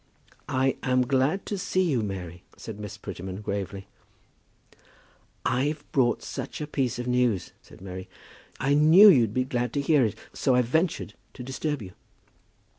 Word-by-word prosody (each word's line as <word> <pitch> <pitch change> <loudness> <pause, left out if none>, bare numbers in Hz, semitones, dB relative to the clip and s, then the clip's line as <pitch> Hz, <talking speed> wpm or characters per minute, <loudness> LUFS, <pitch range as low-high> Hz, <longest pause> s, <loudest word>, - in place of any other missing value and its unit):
"I 130 -1 +1
am 130 -1 +2
glad 135 +8 +1
to 205 - -3
see 185 0 +1
you, 140 -10 +1
Mary," 90 -4 -5 0.2
said 110 -2 -8
Miss 105 0 -7
Prettyman, 95 -1 -7
gravely. 100 -1 -4 1.6
"I've 145 +4 0
brought 120 -4 +2
such 135 -1 -6
a 150 - -3
piece 135 -5 -1
of 125 - -4
news," 125 -7 +1
said - - -17
Mary. 95 -1 -8 0.5
"I 140 +2 +1
knew 160 +8 +8
you'd 120 - +5
be 130 +4 +1
glad 125 -1 -2
to 145 - 0
hear 140 -1 +3
it, 110 -3 -1 0.2
so 130 -3 +1
I 125 - +4
ventured 160 +8 -1 0.2
to 125 - -7
disturb 135 0 -3
you." 95 - -9
125 Hz, 160 wpm, -26 LUFS, 105-145 Hz, 1.6 s, knew